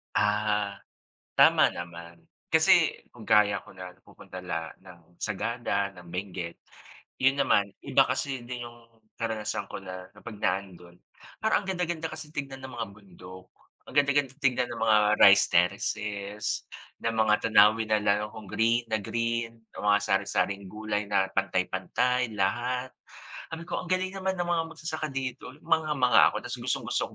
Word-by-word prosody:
Ah, 105 -1 +1 0.6
tama - - +6
naman, 85 -1 -9 0.2
kasi - - +4
kung - - -13
gaya 105 -2 +4
ko - - -14
nagpupunta 95 +1 -11
la 80 -3 -4
ng 85 -2 -17
Sagada, 100 -2 -1
ng 90 -2 -14
Benguet, 90 -1 -5 0.6
'yon 135 +1 +4
naman 105 -7 +3 0.2
iba - - +4
kasi 135 -2 -2
din 125 -1 -5
'yong 115 -1 -19 0.2
karanasan 110 -3 -3
ko - - -6
na 90 0 -8
kapag 100 +1 -10
naando'n, 90 -2 -3 0.5
parang 220 -1 +2
ang 195 - -11
ganda-ganda 175 -3 -2
kasi 155 -1 -8
tignan 135 -3 -6
ng 130 - -7
mga 115 -3 -3
bundok, 95 -2 -14 0.4
ang - - -10
ganda-ganda 140 -2 +3
tignan 125 -3 +1
ng 120 - -6
mga 110 -1 +5 0.2
rice 100 0 +8
terraces, 100 +3 0 0.6
ng 115 - +1
mga 110 -1 +3 0.2
tanawin 110 +2 +6
na 105 - +4
lalo 105 +1 +1
kung 110 -3 -10
green 115 +4 +2
na 110 - +1
green 115 +1 -2 0.2
o - - -7
mga 105 0 +4
sari-saring 100 0 0
gulay 105 -1 -3
na 95 - +3
pantay-pantay, 100 +6 0
lahat. 125 +6 -1 0.6
Sabi 165 +1 -6
ko, - - -3
"Ang 175 - -10
galing 185 0 +1
naman 190 0 -1
ng 175 - -1
mga 170 -1 +1
magsasaka 155 -1 -4
dito." 130 -1 -5
Mangha-mangha 145 -7 +4
ako, - - -2
ta's - - -4
gustong-gusto - - -2
105 Hz, 150 wpm, -28 LUFS, 95-125 Hz, 0.6 s, rice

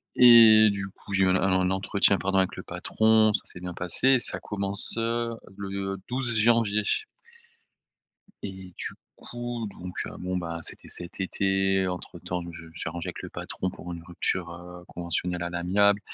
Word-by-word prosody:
Et 115 -3 +8
du 100 -1 -4
coup, 100 +1 -11
j'ai 95 0 +4
même 95 0 +3
un 95 0 +2
un 90 0 +2
entretien 95 +1 +3
pardon 95 +1 0
avec 95 -1 +2
le - - -7
patron, 110 -1 +2
ça - - +4
s'est - - -9
bien 90 0 -5
passé, 125 +10 +2
ça - - -3
commence, 100 0 +1
heu, 115 0 -1 0.2
le 95 0 -4
12 125 -1 -2
janvier. 105 -2 +3 1.6
Et 95 -2 -8
du - - -5 0.2
coup, 120 -2 -5
donc, 90 0 -7
heu, - - -7
bon, 90 0 -3
bah, 85 -2 -4
c'était - - -6
cet 90 +2 -8
été, 95 0 +1
entre 90 -1 -6
temps, 90 0 -4
je 85 - -10
me - - -16
suis 85 - -5
arrangé 85 +1 -5
avec - - -7
le - - -8
patron 95 - -4
pour 90 0 -9
une 85 - -7
rupture, 85 0 -2
heu, 90 +1 -11
conventionnelle 85 +1 -3
à 85 - -3
l'amiable. 100 +4 +2
95 Hz, 180 wpm, -26 LUFS, 90-105 Hz, 1.6 s, Et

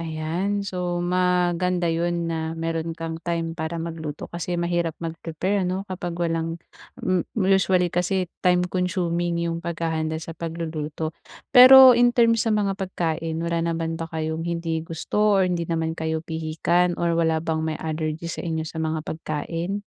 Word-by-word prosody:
ayan. 170 +5 -2
So 175 -2 -2
maganda 180 0 +1
'yun 170 0 -1
na 160 0 -3
meron 165 0 -3
kang 165 0 -5
time 165 -1 -2
para 160 +1 -4
magluto, 160 -3 -5
kasi 175 +1 -4
mahirap 170 -1 -1
mag-prepare 175 +4 -2
ano, 190 +2 -2
kapag 175 -3 -5
walang 165 -1 -1 0.5
m 185 -1 +2 0.2
usually 185 -3 +3
kasi 180 +1 +1 0.2
time-consuming 180 -1 0
yung 170 0 -2
paghahanda 160 -2 -2
sa 165 +1 -6
pagluluto. 160 -1 -4 0.4
Pero 260 0 +11
in 240 +1 +3
terms 230 -1 +4
sa 225 - +1
mga 200 -2 +1
pagkain, 165 -4 -3
wala 170 0 -1
naman 165 0 -2
ba 165 - -4
kayong 160 +1 -3
hindi 165 -1 -2
gusto 200 +6 0
or 190 - +4
hindi 175 -2 -1
naman 160 -1 -1
kayo 160 0 -3
pihikan 165 +2 0
or 170 -1 0
wala 165 -1 +2
bang 160 -1 -1
may 160 0 -2
allergy 160 +1 -3
sa - - -5
inyo 160 -2 -2
sa 160 0 -6
mga 160 -1 -2
pagkain? 165 +5 -4
170 Hz, 155 wpm, -24 LUFS, 160-180 Hz, 0.5 s, Pero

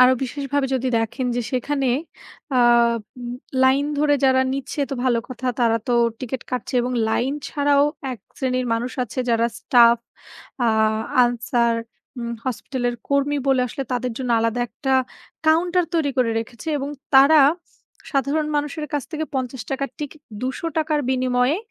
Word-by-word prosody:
আরো 255 0 +8
বিশেষভাবে 280 +1 -1
যদি 260 0 0
দেখেন 225 +3 -2
যে, - - +1
সেখানে 270 +1 0 0.7
আ - - +4 1.1
লাইন 270 +2 +4
ধরে 295 -1 +3
যারা 260 0 +5
নিচ্ছে 275 +2 -4
তো - - -1
ভালো 245 -2 +3
কথা। 255 0 -6
তারা 230 -1 +3
তো 245 - 0 0.3
টিকেট 255 0 -4
কাটছে 250 0 -3
এবং 250 +1 -2 0.2
লাইন 245 +4 0 0.2
ছাড়াও 285 -1 +3 0.3
১ 245 - -8 0.2
শ্রেণীর 255 -1 0
মানুষ 240 +2 -3
আছে 240 +2 -9
যারা 230 0 +3
স্টাফ, 235 -1 +5 0.7
আ - - +3 0.6
আনসার, 235 -1 +1 0.4
উম 235 -1 -4
হাসপাতালের 245 0 -2
কর্মী 280 +1 +1
বলে 260 -1 +4
আসলে 270 +3 -5
তাদের 250 -1 -1
জন্য 255 -2 -3
আলাদা 230 +1 0
১ - - -33
টা 265 - +2 0.5
কাউন্টার 350 +3 +3
তৈরি 310 -4 +2
করে 250 -3 +2
রেখেছে 230 +5 -7
এবং 275 0 -3 0.3
তারা, 280 +3 +8 0.7
সাধারণ 285 +3 +1
মানুষের 295 +1 -2
কাছ 290 -2 0
থেকে 315 0 -2
৳৫০-র 265 +1 -3
টিকেট, 300 +1 -7 0.2
৳২০০-র 305 +3 -1
বিনিময়ে, 255 +2 +2
260 Hz, 145 wpm, -22 LUFS, 245-285 Hz, 1.1 s, আরো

